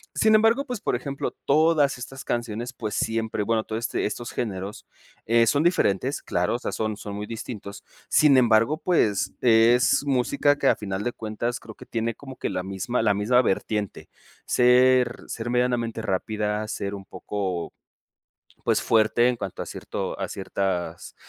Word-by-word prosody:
Sin 220 0 +4
embargo, 225 +6 +4
pues 245 -6 -5
por - - 0
ejemplo, 140 +2 -4
todas 150 -1 +3
estas 135 +2 -8
canciones, 120 +1 -3
pues 110 -4 -5
siempre, 110 -2 -1
bueno, 110 0 +1
todo 110 - -4
este 115 - -2
estos 120 +3 -4
géneros 100 -3 -4 0.4
eh, 115 0 +4
son 145 +6 +3
diferentes, 135 - +1
claro, 90 +6 0
o - - -3
sea, - - -4
son 110 -1 -2
son 100 -1 -7
muy 105 - -4
distintos. 110 -3 -7 0.3
Sin 150 -3 +5
embargo, 115 +3 +4
pues 110 - +1
es 120 +3 +4
música 140 +2 +2
que - - 0
a - - +5
final 100 -1 -4
de 120 - -2
cuentas 115 +2 -3
creo 110 - -11
que - - -13
tiene 115 -1 -2
como 135 -2 -10
que - - -3
la 90 - -3
misma 95 +6 -2
la 105 -2 +3
misma 115 +5 +3
vertiente. 105 -2 -2 0.4
Ser, 125 0 +4
ser 115 +1 -5
medianamente 120 -2 0
rápida, 105 +1 -2
ser 100 -1 -4
un 95 -1 -10
poco, 95 -4 -4 0.9
pues - - +2
fuerte 115 +2 +3
en 125 - 0
cuanto 100 -5 -5
a - - -7
cierto - - -5
a - - -1
ciertas 90 -3 -3
115 Hz, 170 wpm, -25 LUFS, 105-125 Hz, 0.9 s, Sin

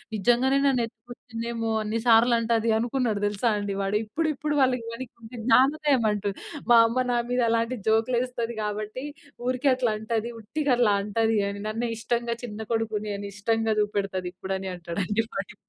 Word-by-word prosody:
నిజంగానే 245 +6 +3
నన్ను 265 -3 +3
ఎత్తు‌కొచ్చింది 235 0 -9
ఏమో! 225 -1 -2
అన్ని 215 +2 -2
సార్లు 235 +1 +6
అంటది 230 0 +1
అనుకున్నాడు 235 -2 0
తెలుసా 210 +3 0
అండి. 205 -1 -2
వాడు 195 +2 +1
ఇప్పుడు, 305 +10 -1
ఇప్పుడు 300 +2 -2
వాళ్ళకి 250 -3 +2
వానికి 235 -1 -9
జ్ఞానోదయం 270 +1 +4
అంటు, 205 -1 -1 0.4
మా 235 - +9
అమ్మ, 255 +3 0
"నా 240 - +2
మీద 250 0 +2
అలాంటి 230 +2 0
జోక్‌లు 225 +3 +3
ఏస్తది 235 -2 -3
కాబట్టి, 210 +4 -4 0.4
ఊరికే 255 +2 +2
అట్లా 245 -4 0
అంటది. 225 +1 -2
ఉట్టిగా 275 +5 -1
అట్లా 230 -4 +4
అంటది 220 +2 +1
అని 200 0 -6
నన్నే 230 +2 -2
ఇష్టంగా, 235 +1 -1
చిన్న 210 -1 -8
కొడుకుని 215 -2 -1
అని, 200 0 -6
ఇష్టంగా 225 +1 +1
చూపెడతది 195 -3 -2
ఇప్పుడు" 190 +1 -4
అని, 190 - -5
అంటాడండి 180 +5 -1
వాడిప్ 195 +2 -5
230 Hz, 165 wpm, -26 LUFS, 210-245 Hz, 0.4 s, మా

